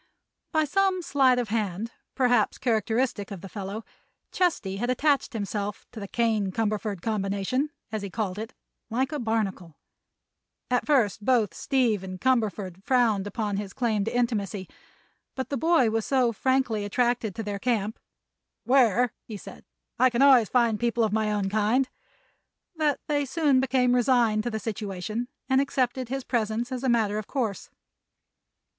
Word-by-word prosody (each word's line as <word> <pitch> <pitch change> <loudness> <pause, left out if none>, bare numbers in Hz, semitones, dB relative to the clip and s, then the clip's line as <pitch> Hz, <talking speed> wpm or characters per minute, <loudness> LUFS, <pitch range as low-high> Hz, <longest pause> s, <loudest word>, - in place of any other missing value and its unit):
By 315 -1 +2
some 380 +3 +1
sleight 265 -5 +3
of 245 -3 -1
hand, 215 0 -2 0.2
perhaps 250 -2 +2
characteristic 225 -2 0
of 195 -4 -7
the 195 - -8
fellow, 200 +2 -6 0.5
Chesty 215 - 0
had 240 +4 -2
attached 280 +2 +1
himself 205 -1 -3
to 225 - -8
the 200 - -6
"Kane 220 -3 0
Cumberford 210 -3 -2
Combination," 210 +6 -1 0.2
as 215 -1 -2
he 200 - -5
called 200 -1 -3
it, 225 +3 -7 0.3
like 260 +5 0
a 300 - -2
barnacle. 210 - -2 1.0
At 250 - +1
first 235 -8 +2
both 225 -7 +2
Steve 235 -6 +1
and 185 -1 -7
Cumberford 205 -7 0
frowned 225 -6 +2
upon 205 -1 -2
his 200 -1 -5
claim 220 -5 0
to - - -2
intimacy, 205 -6 -1 0.7
but 260 - -4
the 280 - -1
boy 315 -5 +3
was 225 0 0
so 255 -4 +2
frankly 260 -2 +1
attracted 235 0 0
to 225 - -4
their 205 -1 -4
camp, 220 -2 -1 0.6
"where," 245 -2 +3 0.2
said - - -12 0.3
he, - - +2
"I - - +6
can 245 +2 +2
always 260 -6 +6
find 235 -4 +2
people 235 -1 +1
of 215 -2 0
my 215 -1 +1
own 205 -2 0
kind," 215 +6 +2 0.9
that 305 -3 +1
they 290 -1 +1
soon 280 -1 +2
became 255 -1 +2
resigned 240 -3 +3
to - - 0
the 220 -2 -3
situation 215 +1 -4 0.2
and 265 0 +4
accepted 260 -2 -1
his 270 0 -3
presence 235 0 -1
as 255 0 -4
a 260 - +1
matter 215 -3 +2
of 215 - -7
course. 225 -9 -3
230 Hz, 160 wpm, -26 LUFS, 205-255 Hz, 1.0 s, I